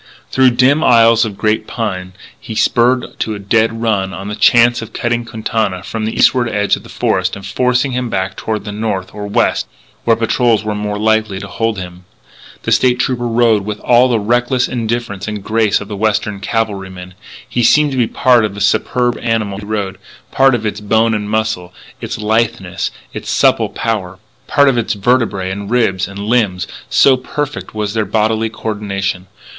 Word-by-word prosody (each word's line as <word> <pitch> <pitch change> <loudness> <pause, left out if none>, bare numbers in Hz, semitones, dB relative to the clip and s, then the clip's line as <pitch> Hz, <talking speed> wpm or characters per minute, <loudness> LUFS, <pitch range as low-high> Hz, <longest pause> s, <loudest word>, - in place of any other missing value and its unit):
Through 130 -1 +5
dim 140 +5 +4
aisles 115 -1 +5
of 105 -3 -7
giant 110 0 0
pine 95 -5 -4 0.3
he 110 - -8
spurred 125 +3 +1
to 110 - -2
a - - -5
dead 115 +3 +1
run 100 -5 0
on 95 +3 -6
the 105 - -4
chance 120 +3 +4
of 115 - -9
cutting 120 0 -1
Quintana 110 -4 -2
from 110 +3 -4
the 110 - -3
eastward 120 -2 +3
edge 105 -2 +1
of - - -10
the - - -15
forest - - 0
and 100 -1 -9
forcing 125 +5 +1
him 125 -1 -2
back 95 -2 -2
toward 110 -2 -4
the 105 - -5
north 105 -3 -3
or 105 -1 -6
west, 100 - +1 0.4
where 115 - +3
patrols 115 0 +1
were 105 0 -2
more 105 0 -3
than 105 - -4
likely 110 -3 +1
to 100 - -7
hold 115 +2 -2
him. 90 -1 -8 0.6
The - - -2
State 125 -1 +3
Trooper 125 -1 -1
rode 115 -3 +2
with 105 +1 -5
all 125 +1 +4
the 115 -2 +2
reckless 120 +3 +1
indifference 115 -4 -3
and 105 -2 -5
grace 110 -1 +1
of 105 - -8
the 105 - -5
Western 105 -1 -1
cavalryman, 95 -4 -3
and - - -20 0.3
he 120 - -1
seemed 150 +5 +4
to 135 - -3
be 120 -3 +2
part 125 -2 +3
of 105 -2 -2
the - - -7
superb 120 +4 +1
animal 110 -4 -1
he 105 - -9
rode 100 -2 -3 0.3
part 135 -1 +4
of 110 -2 -4
its 105 - -3
bone 110 +2 +2
and 105 -1 -2
muscle, 110 -5 -2 0.3
its - - -4
litheness, 110 -4 -1 0.2
its - - -6
supple - - +3
power 95 -5 -3 0.3
part 140 -1 +4
of 130 -3 +3
its 115 -1 -1
vertebræ 100 -3 0
and 100 +1 -5
ribs 105 -6 +1
and 100 - -10
limbs, 100 -4 0 0.2
so 135 - +5
perfect 145 0 -5
was 105 -1 -2
their 110 -1 0
bodily 110 +2 0
co 110 - -16
ordination. 100 -3 -3
110 Hz, 195 wpm, -16 LUFS, 100-120 Hz, 0.6 s, Through